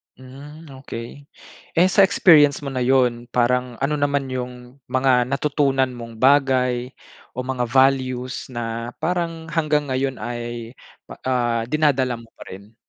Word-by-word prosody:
Hmm, 140 +5 -12
okey. 130 +2 -9 0.5
Eh, 175 - +6
sa 195 +2 +4
experience 155 -7 +5
mo 145 - -6
na 130 - -1
yun 125 -2 +1
parang 125 0 0
ano 145 +2 0
naman 145 -1 0
yung 125 0 -7
mga 130 -1 +3
natutunan 140 -2 +1
mong 115 -2 -10
bagay 130 -2 +2 0.4
o 125 - -5
mga 130 -2 -1
values 130 0 +1
na 115 0 -4
parang 165 0 -2
hanggang 150 -2 0
ngayon 130 0 -2
ay, 120 +1 -6 0.3
pa - - -10
ah, 120 -3 0
dinadala 130 -3 +1
mo 115 - -16
pa - - -15
rin? 100 +4 -12
130 Hz, 140 wpm, -21 LUFS, 120-145 Hz, 0.5 s, Eh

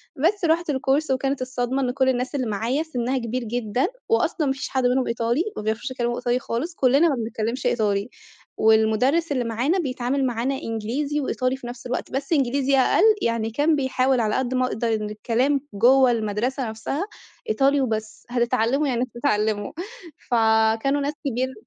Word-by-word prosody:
بس 350 +7 +1
رُحت 335 +1 +1
الكورس 275 +1 +1
وكانت 270 +1 0
الصدمة 255 +1 -2
إن 250 -2 0
كُل 260 0 +2
الناس 255 +2 -1
اللي 255 -4 -1
معايا 230 +8 -1
سِنّها 260 -4 -2
كبير 245 +1 -3
جدًا، 235 +1 -1 0.2
وأصلًا 360 -8 +1
ما 270 - +2
فيش 270 - -5
حد 260 -1 0
منهم 250 +1 +2
إيطالي، 235 +6 0
ما - - -3
بيعرفوش 220 +4 -2
يتكلّموا 240 -2 -1
إيطالي 245 0 0
خالِص، 280 +8 -4
كُلّنا 275 +5 +4
ما 285 - +1
بنتكلّمش 230 +1 -3
إيطالي، 205 -2 +1 0.5
والمدرس 220 +9 +3
اللي 255 -3 0
معانا 240 - 0
بيتعامل 265 -2 -1
معانا 250 +2 -1
إنجليزي 260 +6 -2
وإيطالي 255 -2 -1
في 250 - -9
نفْس 240 0 -9
الوقت، 250 0 -4
بس 275 +4 -2
إنجليزي 275 -1 +2
أقل 265 +7 +3 0.2
يعني، 230 -1 0
كان 295 +7 +2
بيحاول 260 -2 +1
على 215 -2 +1
قد 260 -1 -1
ما 255 0 +2
يقدَر 230 0 -1
إن 215 -1 -2
الكلام 245 +6 0
جُوّه 250 +5 +5
المَدرسة 230 +3 -1
نفْسها 225 +9 -3 0.5
إيطالي 280 -7 +3
وبس، 220 -4 -3
هتتعلّموا 245 +3 +1
يعني 245 -2 0
هتتعلّموا، 215 -5 0 0.6
فكانوا 225 +4 +3
ناس 285 +1 -1
كبير 260 +1 -1
255 Hz, 170 wpm, -23 LUFS, 230-275 Hz, 0.6 s, جُوّه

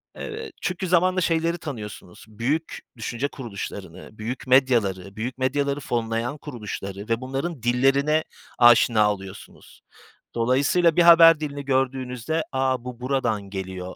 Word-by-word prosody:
Evet, 450 0 -7
çünkü 185 0 -2
zamanla 185 +1 +3
şeyleri 165 0 +1
tanıyorsunuz, 105 - -8
büyük 125 +9 -3 0.2
düşünce 120 +4 -3
kuruluşlarını, 120 -9 -8
büyük 120 +5 -5
medyaları, 110 -8 +2
büyük 120 +4 -4
medyaları 140 +2 0
fonlayan 120 +1 -2
kuruluşları 105 -7 -7
ve 115 +1 0
bunların 135 +2 -4
dillerine 135 +5 +2 0.4
aşina 115 -3 +5
oluyorsunuz. 95 -1 -12 0.5
Dolayısıyla 140 +8 +2
bir - - +5
haber 165 -2 +8
dilini 145 -2 -5
gördüğünüzde 130 +2 -1
“A, 130 -2 0
bu 125 -1 -7
buradan 125 -5 -1
geliyor!” 95 -1 -6
130 Hz, 120 wpm, -24 LUFS, 115-150 Hz, 0.5 s, haber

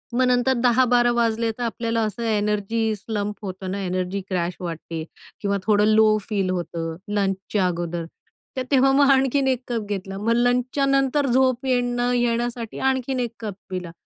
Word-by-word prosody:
मग 255 +1 +3
नंतर 250 +1 +3
10-12 245 0 +4
वाजले 230 -1 +1
तर 245 - -3
आपल्याला 230 0 -1
असं 215 +2 -4
एनर्जी 215 0 0
स्लंप 210 0 -4
होतं 190 -2 -6
ना, 200 - -3
एनर्जी 185 +1 -2
क्रॅश 180 -2 -1
वाटते 165 -2 -5 0.4
किंवा 200 -1 0
थोडं 210 -1 +4
लो 215 0 +5
फील 195 -3 -2
होतं, 170 -2 -3 0.2
लंचच्या 195 0 0
अगोदर. 170 -1 -3 0.5
तर 260 - 0
तेव्हा 270 0 +5
मग 280 +1 +4
आणखीन 270 0 +3
1 260 -2 +1
कप 230 -3 -2
घेतला. 195 -1 -4
मग 215 +3 0
लंचच्या 245 +3 +1
नंतर 275 +1 +2
झोप 255 0 +2
येणं 245 -2 +1
न 245 0 +1
नये 240 -1 +2
यासाठी 240 -1 -4
आणखीन 260 0 -1
1 240 -2 -1
कप 215 -3 -4 0.2
पिला. 180 -2 -5
225 Hz, 170 wpm, -23 LUFS, 195-245 Hz, 0.5 s, लो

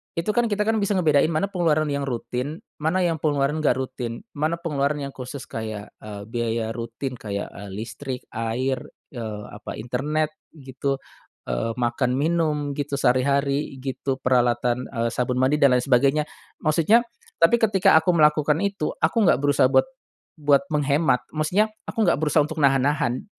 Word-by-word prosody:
Itu 170 +5 0
kan 240 +2 +2
kita 210 -1 0
kan 220 +1 +1
bisa 200 0 0
ngebedain 155 -6 +4
mana 165 +5 -1
pengeluaran 155 -5 +1
yang 140 -1 -2
rutin 125 +4 -4 0.2
mana 165 +5 +1
yang 165 -2 0
pengeluaran 145 0 +1
nggak 155 - +2
rutin? 130 -3 -5
Mana 155 +2 -1
pengeluaran 150 -3 -1
yang 140 - -5
khusus 130 +1 -7
kayak, 110 -2 -6
eee, 105 -1 -7
biaya 115 -1 -2
rutin 115 +3 -5
kayak, 100 -2 -4
eee, 100 0 -9
listrik, 125 +4 -6
air, 120 +4 -1 0.3
eee, 110 -5 -6
apa 105 - -8
internet 150 +7 -1 0.2
gitu, 135 -1 -3 0.5
eee, - - -1
makan, 125 +1 0
minum 150 -1 0
gitu, 145 0 -2
sehari-hari 140 +3 +1
gitu, 135 0 -2
peralatan, 125 0 +2
eee, 115 -2 -1
sabun 125 +1 -1
mandi 135 +3 +2
dan 140 -3 +5
lain 125 - +1
sebagainya, 140 +3 +3 0.4
maksudnya 165 +9 +4 0.4
tapi 200 +9 +5
ketika 200 -7 +5
aku 160 +3 +2
melakukan 150 -1 +4
itu 200 -6 -2
aku - - +2
nggak - - +4
berusaha 145 -2 +4
buat 130 0 +4 0.6
buat 145 0 +4
menghemat 145 -2 +2
maksudnya 180 +8 +2 0.2
aku 225 - 0
enggak 170 - +4
berusaha 155 0 +2
untuk 160 +2 -5
nahan-nahan. 135 -1 +2
140 Hz, 160 wpm, -24 LUFS, 125-155 Hz, 0.6 s, dan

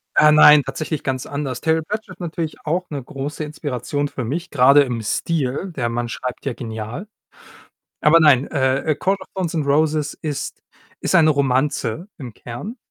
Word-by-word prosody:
Äh, 150 0 +6
nein, 150 -1 +8
tatsächlich 155 +3 -4
ganz 130 -1 -2
anders. 140 -4 -4
Terry 160 0 +2
Pratchett 210 +6 -6
ist - - -45
natürlich 165 -3 -5
auch 175 +3 -1
'ne 140 -4 -5
große 140 +4 -5
Inspiration 145 -1 -3
für 130 - -5
mich, 165 +9 -3
grade 140 +2 +6
im 120 -4 -3
Stil. 145 - -2
Der 120 -3 -1
Mann 120 0 -2
schreibt 125 +4 -5
ja 135 - -1
genial. 115 - -6 0.9
Aber 160 +2 +6
nein, 145 -4 +5
äh, 130 -2 0
„A - - +1
Court 195 +1 0
of - - -10
Thorns 180 -3 -3
and 155 -3 0
Roses“ 150 +1 +1
ist 150 -3 -4 0.4
ist - - 0
eine 155 -2 +6
Romanze 140 - 0
im 125 -5 -8
Kern. 180 - -8
145 Hz, 175 wpm, -21 LUFS, 130-160 Hz, 0.9 s, nein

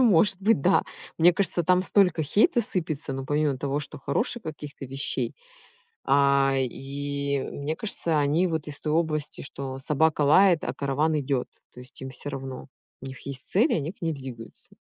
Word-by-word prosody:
ну - - +6
может 195 -2 +4
быть, 205 -5 +3
да. 185 +7 +4 0.4
Мне 175 +2 +6
кажется 175 -1 +1
там 180 +2 +3
столько 180 -4 +3
хейта 220 - +3
сыпется, 160 -9 -1
но 135 0 -4
помимо 145 -1 0
того, 140 +2 -1
что 140 - -7
хороших 220 - -2
каких-то 150 -3 -8
вещей, 135 +2 -2 0.7
а, 140 0 +4
и, 140 +2 -2
мне 145 +3 -3
кажется 165 -7 -1
они 150 +6 +2
вот 160 -3 -3
из 145 -1 -6
той 155 -1 -2
области 155 -3 -1
что 135 -1 -6
собака 150 +3 +1
лает, 170 +4 +5
а - - -2
караван 150 +3 0
идёт. 135 -2 -1 0.3
То - - -12
есть 125 0 -10
им 135 - -5
всё 130 +2 -6
равно. 135 -1 -7 0.3
У 135 - -8
них 130 0 -10
есть 140 -2 -6
цель, 230 - +3
и - - +3
они 155 0 -2
к 195 - -27
ней 165 -1 0
двигаются. 130 -5 -9
145 Hz, 185 wpm, -26 LUFS, 135-170 Hz, 0.7 s, ну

